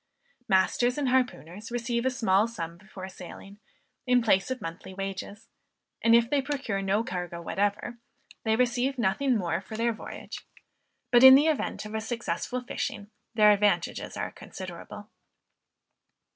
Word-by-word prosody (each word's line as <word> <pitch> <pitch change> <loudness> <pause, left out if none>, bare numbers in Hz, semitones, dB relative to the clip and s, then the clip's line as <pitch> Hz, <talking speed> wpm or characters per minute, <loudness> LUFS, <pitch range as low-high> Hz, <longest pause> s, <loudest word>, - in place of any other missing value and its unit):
Masters 240 +7 +2
and 280 -3 0
harpooners 215 - -1
receive 235 +1 -1
a - - +4
small 220 -5 +2
sum 170 -8 -6
before 190 0 -10
sailing, 195 +2 -11 0.5
in 250 -1 +4
place 195 -2 +3
of 260 0 -3
monthly 170 +1 -8
wages; 195 +3 -6 0.5
and 230 0 +5
if 235 0 +4
they 280 +2 +1
procure 270 -8 -3
no 195 +3 +1
cargo 180 -4 -5
whatever, 205 +6 -2 0.4
they 220 -1 +2
receive 250 +3 +1
nothing 240 +4 +1
more 175 -2 -1
for 210 +3 -8
their 230 +1 +1
voyage; 220 - -9 0.7
but 240 +1 +6
in 265 0 +12
the 285 +3 +5
event 310 -8 -1
of 210 - -8
a 220 - -2
successful 240 +2 -3
fishing, 215 -3 -5 0.2
their 210 -1 +7
advantages 205 0 0
are - - -3
considerable. 190 +3 -9
220 Hz, 145 wpm, -28 LUFS, 195-245 Hz, 0.7 s, in